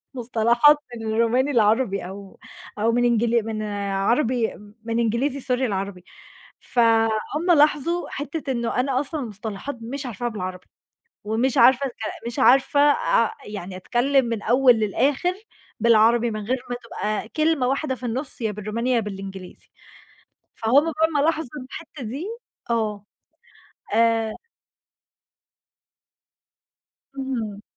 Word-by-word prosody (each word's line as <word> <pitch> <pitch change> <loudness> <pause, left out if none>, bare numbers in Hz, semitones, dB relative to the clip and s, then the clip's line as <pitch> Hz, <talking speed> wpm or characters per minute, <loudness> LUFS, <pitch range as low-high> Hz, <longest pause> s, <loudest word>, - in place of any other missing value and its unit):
مصطلحات 240 +4 +4 0.2
من 225 -1 -6
الروماني 240 +5 +2
لعربي، 215 -3 +2
أو 195 0 -11 0.4
أو 225 +2 +2
من 245 +1 +2
إنجل 235 -1 +2
من 215 -1 -3 0.3
عربي 235 +4 +1 0.3
من 230 0 -2
إنجليزي 245 +5 0
Sorry 250 0 -1
لعربي. 195 -5 -3 0.6
فهُم 230 +8 +1
لاحظوا 305 +4 +2
حتّة 290 -1 -4
إنه 235 0 -1
أنا 260 0 +1
أصلًا 300 +2 -3
المصطلحات 215 +3 -6
مش 265 +4 -5
عارفاها 240 +1 -3
بالعربي. 185 -4 -6 0.6
ومش 235 +6 0
عارفة 260 +3 +6
أتكل 235 -2 -6
مش 235 - -4
عارفة 275 +3 +4
أ 230 - +2
يعني 195 -3 -7
أتكلم 260 +7 +1
من 235 - -2
الأول 245 +4 +4
للآخر 270 - +1 0.5
بالعربي 230 +1 +4
من 215 - -4
غير 255 +3 0
ما 245 - -2
تبقى 215 +1 -3
كلمة 310 -5 +1
واحدة 270 0 -1
في 250 - -9
النص 255 +2 -4
يا 220 -2 0
بالروماني 215 +5 -3
يا 240 - +3
بالإنجليزي. 195 -3 -8 0.9
فهم 255 +7 +3
بقى 320 +1 +2
ما 285 - +3
لاحظوا 320 -2 +1
في 290 -3 -8
الحتة 310 -3 -9
دي 260 +9 -5 0.5
آه. 210 -3 -1 0.9
آآ 225 -1 +2 2.8
إهم. 235 -7 -4
235 Hz, 125 wpm, -23 LUFS, 220-270 Hz, 2.8 s, عارفة